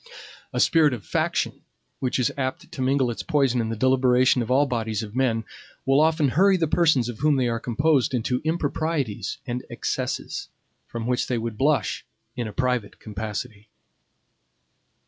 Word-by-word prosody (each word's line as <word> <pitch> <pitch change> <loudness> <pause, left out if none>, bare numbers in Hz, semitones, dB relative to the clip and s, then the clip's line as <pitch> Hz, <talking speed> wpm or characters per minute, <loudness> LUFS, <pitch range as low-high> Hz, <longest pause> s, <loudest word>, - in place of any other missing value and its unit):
A - - -2
spirit 155 -4 +4
of 105 - -11
faction, - - -1 0.4
which 125 -2 -1
is 125 - +1
apt 130 -2 -4
to - - -6
mingle 130 -1 +2
its 115 - -5
poison 135 -6 +1
in 110 - -2
the 115 - -2
deliberations 130 +1 +3
of 115 - -4
all 135 +3 +4
bodies 115 -4 -2
of 105 +1 -9
men, 120 -4 +1 0.4
will 135 +2 +4
often 155 -2 +3
hurry 190 +8 +4
the 165 -2 +1
persons 150 -7 +3
of 120 -3 -6
whom 150 +1 +3
they 130 -2 +1
are 115 -1 -1
composed 135 +3 +1
into 125 +1 -1
improprieties 155 - -2
and 125 -1 -3
excesses, - - -3 0.4
for 115 - -6
which 125 +2 0
they 125 - 0
would 115 -1 -3
blush 145 +6 +1 0.3
in 120 -2 -3
a - - -6
private 125 -1 -1
capacity. 105 0 -6
125 Hz, 165 wpm, -24 LUFS, 115-140 Hz, 0.4 s, spirit